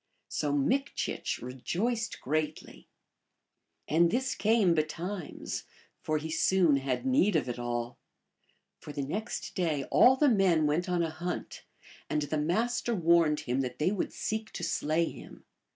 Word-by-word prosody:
So 145 - -1
Mikchich 255 - -1
rejoiced 205 - -2
greatly. 155 +2 -3 1.0
And 170 +2 +4
this 255 +7 0
came 215 -5 +3
betimes, 165 +3 -3 0.4
for 155 - 0
he 160 +1 -5
soon 170 -4 +3
had 135 - -2
need 255 - +3
of 150 - +1
it 120 0 -4
all. 120 0 -3 0.8
For - - -9
the 140 -1 -3
next 210 +10 -4
day 160 -7 0
all 255 +1 +7
the 295 +2 +3
men 190 - +4
went 160 +5 0
on 175 -1 +1
a 165 - -2
hunt, 175 +3 -5 0.4
and 150 0 0
the 150 +1 -2
Master 230 +9 0
warned 170 -4 +3
him 125 +2 -1
that 125 -2 -4
they 155 +5 +1
would 205 - -2
seek 220 0 -3
to - - -5
slay 155 +3 +1
him. - - -10
165 Hz, 150 wpm, -30 LUFS, 150-205 Hz, 1.0 s, all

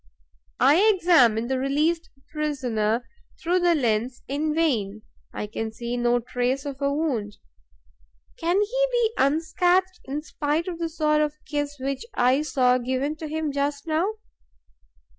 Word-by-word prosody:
I 280 +5 +5 0.2
examine 250 - +4
the 260 +1 -1
released 310 +5 0 0.2
prisoner 245 -7 -1 0.3
through 355 +2 +1
the 350 -1 +3
lens 240 -2 -1
in 295 +3 -1
vain; 215 -11 0 0.3
I - - -4
can 220 +1 -4
see 235 +2 -4
no 240 0 +2
trace 250 +3 -2
of 280 -1 -6
a 280 0 +1
wound. 255 -9 -2 1.0
Can 345 +4 +1
he - - +1
be 470 -2 +1
unscathed, 355 +6 +2
in 285 +3 -4
spite 305 +2 -2
of 345 -2 -5
the 335 -1 -2
sort 305 -1 +1
of 300 0 -1
kiss 290 -1 -3
which 270 +1 -3
I 255 +3 +3
saw 255 -4 +2
given 260 +4 -2
to 315 - -6
him 310 0 -2
just 285 0 -2
now? 335 +6 0
285 Hz, 145 wpm, -25 LUFS, 250-325 Hz, 1.0 s, I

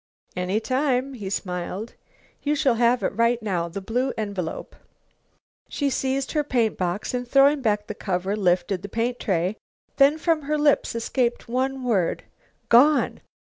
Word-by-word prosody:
"Any 180 +3 0
time," 260 +3 0
he 205 -6 -6
smiled. 185 +3 -4 0.5
"You 295 +1 0
shall 280 -4 +2
have 240 +1 +2
it - - -1
right 230 +2 +2
now 180 -6 -2
the 195 +4 -6
blue 250 +7 -1
envelope." 200 -6 -4 0.9
She 285 -2 -1
seized 265 +1 -1
her 300 -2 +1
paint 240 -6 +1
box, 180 +5 -2
and 245 0 -3
throwing 275 +3 +4
back 210 -3 0
the 210 - -5
cover 190 0 -2
lifted 180 -1 +1
the 200 - -7
paint 235 +3 -2
tray. 185 +1 -1 0.4
Then 280 +2 +5
from 325 -1 +1
her 300 +2 -1
lips 295 -5 +2
escaped 240 +1 -1
one 260 +2 -1
word: 205 -9 0 0.4
"Gone!" 280 +6 +4
235 Hz, 155 wpm, -24 LUFS, 195-270 Hz, 0.9 s, Then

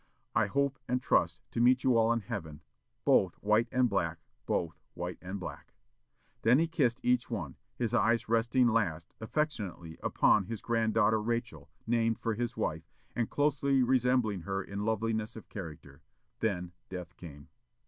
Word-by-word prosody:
I - - +3
hope 140 -1 0
and 125 +1 +1
trust - - +1
to 115 - -1
meet 125 +1 +5
you 130 -2 +4
all 115 0 +4
in 115 0 +1
Heaven, 80 -5 -6 0.4
both 95 -3 +4
white 110 +3 +2
and 125 0 +3
black 90 -6 -1 0.3
both 85 -2 -1 0.2
white - - -5
and 95 +2 -5
black." 90 - -8 0.7
Then 120 +3 +5
he 165 +2 +2
kissed 140 -8 +1
each 125 -1 +2
one, 85 - -4 0.2
his 120 -2 -2
eyes 115 0 +2
resting 115 +3 +3
last, 90 -9 0
affectionately, 105 - -3
upon 100 -3 +3
his 115 +1 -6
granddaughter 110 -2 +2
Rachel, 115 - -3 0.2
named 115 -1 +1
for 115 - -1
his 120 +2 -3
wife, - - -2 0.3
and 115 -2 0
closely 140 -2 +2
resembling 125 -5 +2
her 95 +2 -3
in 100 +2 -5
loveliness 110 0 -1
of 110 - -11
character; 75 -7 -9 0.4
then 90 -5 -1 0.2
death 90 -2 -7
came. 75 -5 -11
115 Hz, 160 wpm, -31 LUFS, 95-120 Hz, 0.7 s, meet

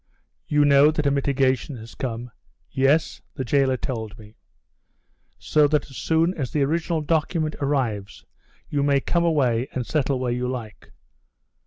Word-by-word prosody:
"You 150 0 +3
know 140 +1 +6
that 155 -1 -1
a 140 - +3
mitigation 135 -1 0
has 115 +1 -11
come?" 120 -1 -5 0.4
"Yes, 135 +4 +1
the 130 - -4
jailer 135 +1 +2
told 110 -4 -5
me." 105 -2 -14 1.0
"So 150 -1 +3
that 150 -1 -1
as - - -12
soon 165 +2 +1
as 140 -9 -4
the 150 - 0
original 165 +2 0
document 155 0 0
arrives 125 -8 -2 0.4
you 145 - -1
may 140 -1 +3
come 170 +5 0
away 130 -7 +1
and 125 -2 -3
settle 140 -2 0
where 125 -1 -1
you 125 +1 -2
like. 115 -5 -7
140 Hz, 155 wpm, -23 LUFS, 125-150 Hz, 1.0 s, know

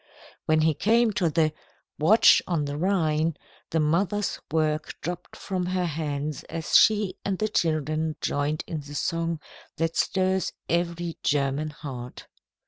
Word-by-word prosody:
When 155 0 +4
he 160 0 +3
came 225 +7 +3
to 175 -4 +1
the 155 -1 +2 0.5
"Watch 195 +10 +6
on 165 -5 0
the 145 0 -4
Rhine," 160 -2 +1 0.3
the 160 - 0
mother's 185 +7 +1
work 155 -1 0
dropped 175 +2 -6
from 185 -2 -3
her 180 0 0
hands 150 -2 -3
as 165 0 -3
she 210 -3 +5
and 195 -1 -1
the 215 - 0
children 155 -3 0
joined 145 +2 -1
in 160 - -4
the 145 0 -9
song 165 +1 -1 0.4
that 165 0 -1
stirs 190 0 +1
every 170 0 -1
German 140 +1 0
heart. 130 -5 -8
160 Hz, 140 wpm, -26 LUFS, 150-180 Hz, 0.5 s, Watch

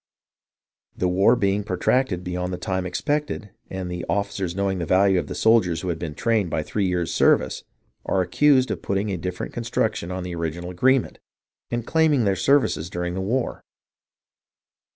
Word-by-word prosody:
The 90 - +1
war 95 +6 +4
being 100 -2 +1
protracted 95 0 0
beyond 90 0 -3
the 90 - -3
time 95 0 -2
expected, 145 - -2 0.2
and 95 -1 -4
the 90 0 -4
officers 100 -3 -1
knowing 100 -1 -1
the 85 - -2
value 95 +1 +4
of - - -5
soldiers 110 -7 +3
who 95 - -3
had 80 -2 -2
been 80 -3 -5
trained 110 -3 +1
by 80 - -1
three 100 +4 -1
years' 90 -2 -1
service, - - +2 0.4
are 95 - +2
accused 130 +8 +3
of - - -3
putting 100 +1 -1
a 95 - -2
different 90 +1 -5
construction 115 -6 -1
on 90 0 -4
the 90 -1 -5
original 85 +1 -4
agreement, 130 +8 +2 0.5
and 120 -1 -3
claiming 160 -5 +3
their 100 -1 +2
services 110 - +2
during 90 -1 -3
the 95 - -3
war. 120 +6 -2
95 Hz, 170 wpm, -23 LUFS, 90-115 Hz, 0.5 s, war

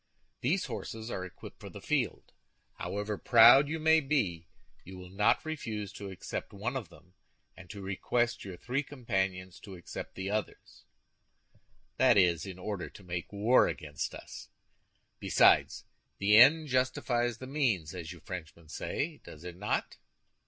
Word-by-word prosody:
These 170 +9 0
horses 110 0 -6
are 90 - -3
equipped 95 - -11
for - - -9
the - - -10
field. - - -2 0.5
However 105 0 -3
proud 120 +4 +7
you 160 - -2
may 160 +1 +5
be, 110 - -1 0.4
you 95 +1 -10
will 90 0 -11
not 105 +8 +2
refuse 110 -10 -5
to 100 -1 -7
accept 95 +1 -6
one 110 +6 -3
of 130 -6 -4
them, 90 0 -19 0.4
and 90 -1 -14
to 100 +1 -8
request 120 +5 -1
your 95 -3 -8
three 125 +8 -2
companions 95 -10 -3
to 100 -3 -10
accept 85 - -8
the 95 +1 -4
others—that 105 -1 -4
is, 90 -2 +3
in 95 -2 -7
order 95 0 -5
to 100 - -15
make 90 -1 -5
war 105 +5 +4
against 75 -2 -4
us. - - -10 0.7
Besides, - - +4 0.3
the 105 +1 +4
end 150 +7 +7
justified 125 -2 0
the 130 - -9
means, 120 - 0
as 85 -3 -6
you 85 -3 -11
Frenchmen 85 -3 -9
say, 150 - -4
does 75 - -12
it 90 -1 -7
not?" 105 +4 -2
105 Hz, 150 wpm, -31 LUFS, 90-125 Hz, 0.7 s, proud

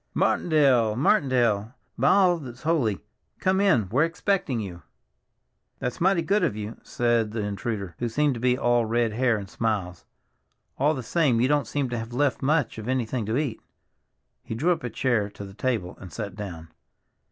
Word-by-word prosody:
"Martindale! 135 -9 +3
Martindale, 120 -4 +2 0.2
by - - +1
all 185 -3 +5
that's 125 -4 -10
holy! 140 - +1 0.4
Come 190 +1 +1
in, 125 - +3
we're 130 +8 +3
expecting 165 - 0
you." 90 -5 -6 1.0
"That's 125 +4 -4
mighty 185 -1 +3
good 200 +6 +2
of - - +1
you," 105 +1 -6
said 120 -3 0
the 110 - -2
intruder, 100 -2 -3
who 120 - -1
seemed 145 +4 +1
to 120 - -6
be 125 +1 +2
all 120 -1 +2
red 115 0 0
hair 120 -1 +2
and 100 -2 -7
smiles. 95 -5 -2 0.7
"All 150 +3 +3
the 130 - -5
same, 135 -2 +2
you 125 - +3
don't 145 -3 +1
seem 145 -2 -1
to 120 -1 -2
have 115 +1 -7
left 140 +1 +1
me 135 - -1
much 150 -6 +1
of 110 - -7
anything 125 -3 -1
to 110 +3 0
eat." 140 -7 -2 0.8
He 110 - -5
drew 160 +10 +2
up 170 - -1
a 120 - -2
chair 115 -5 0
to 100 0 -9
the 95 - -11
table 110 -6 -2
and 95 - -9
sat 100 -4 -5
down. 85 -6 -7
120 Hz, 185 wpm, -25 LUFS, 110-145 Hz, 1.0 s, all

